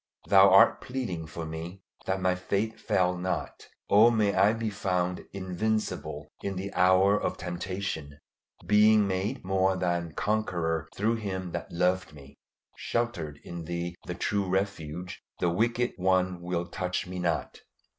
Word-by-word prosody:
Thou 100 0 +7
art 95 +1 +6
pleading 105 -11 -4
for 80 +2 -6
me, 85 +4 -7 0.2
that 95 0 0
my 95 -1 +2
faith 100 +4 -2
fail 90 0 +1
not! 90 +1 -4 0.2
Oh 110 +3 +7
may 105 -4 +2
I 100 - +5
be 115 -1 -2
found 90 -3 -1
invincible 100 +3 -2
in 100 -1 -3
the 95 +2 -5
hour 95 +3 +4
of - - -2
temptation, 90 -4 -4 0.5
being 105 0 +5
made 100 +6 -2
more 95 0 +2
than 85 -2 -1
conqueror 85 -7 -1
through 110 +3 +1
Him 95 -4 -4
that - - -5
loved 90 -1 0
me. 70 -2 -15 0.4
Sheltered 85 -12 -2
in 85 -1 -7
Thee 85 +1 -4
the 90 - -3
true 100 +1 -1
Refuge, 90 -3 -3 0.2
the 85 - +2
wicked 120 +6 +1
one 95 -1 +1
will 85 -1 -2
touch 90 0 -3
me 90 0 -6
not. 85 -3 -2
95 Hz, 145 wpm, -28 LUFS, 85-100 Hz, 0.5 s, Thou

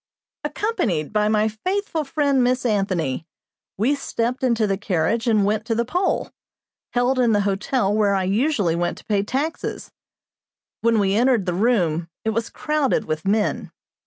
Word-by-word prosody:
Accompanied 230 - -1
by 210 0 +2
my 215 0 +2
faithful 335 - -2
friend, 280 -2 +1
Miss 250 +1 +1
Anthony, 185 - 0 0.5
we 235 +8 +2
stepped 250 -3 -2
into 235 -4 +2
the 195 -1 +1
carriage 200 +4 0
and 215 -3 +3
went 210 +1 0
to 225 - 0
the 235 +1 0
poll, 360 +10 -1 0.6
held 250 +2 +2
in 235 -3 +3
the 205 - +3
hotel 200 +2 0
where 205 -2 +2
I 190 - +1
usually 205 - +1
went 175 0 -1
to - - -14
pay 205 -2 +1
taxes. 275 +10 -3 0.9
When 230 -1 +3
we 195 -2 +2
entered 235 -2 +3
the 180 - -1
room 175 -6 +1 0.2
it 220 - +2
was 230 +1 -2
crowded 295 -7 0
with 155 +2 -3
men. 210 +1 0
220 Hz, 160 wpm, -22 LUFS, 195-255 Hz, 0.9 s, and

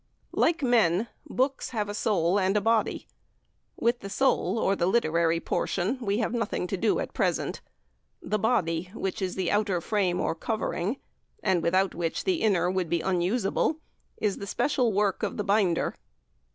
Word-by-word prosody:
Like 330 -2 +2
men, 225 -4 +3 0.2
books 265 +2 0
have 215 -4 -2
a 205 - -4
soul 200 -3 +1
and 195 +2 +1
body. 225 0 +1 0.7
With 235 +1 +1
the 195 - -7
soul, 265 +1 +1
or 200 -3 +2
literary 170 -4 +2
portion, 190 +8 -1
we 200 -3 0
have 230 0 -1
nothing 230 -6 -1
to 185 - -2
do 210 +3 +1
at - - -4
present; - - -1 0.6
the 215 - -2
body, 180 -7 0
which 190 -3 -3
is 185 -1 -2
the 185 -2 -1
outer 205 -3 +1
frame 185 -1 0
or - - 0
covering, 215 +3 -2 0.5
and 190 -4 +2
without 185 +3 +2
which 165 -1 -2
the 370 -3 0
inner 185 -5 +2
would 185 -3 -1
be 170 0 +1
unusable, 190 - 0 0.4
is 205 -2 -1
the 200 - -6
special 250 +2 +1
work 200 -1 +1
of - - -2
the 210 - -1
binder. 195 -4 +2
200 Hz, 165 wpm, -27 LUFS, 180-225 Hz, 0.7 s, men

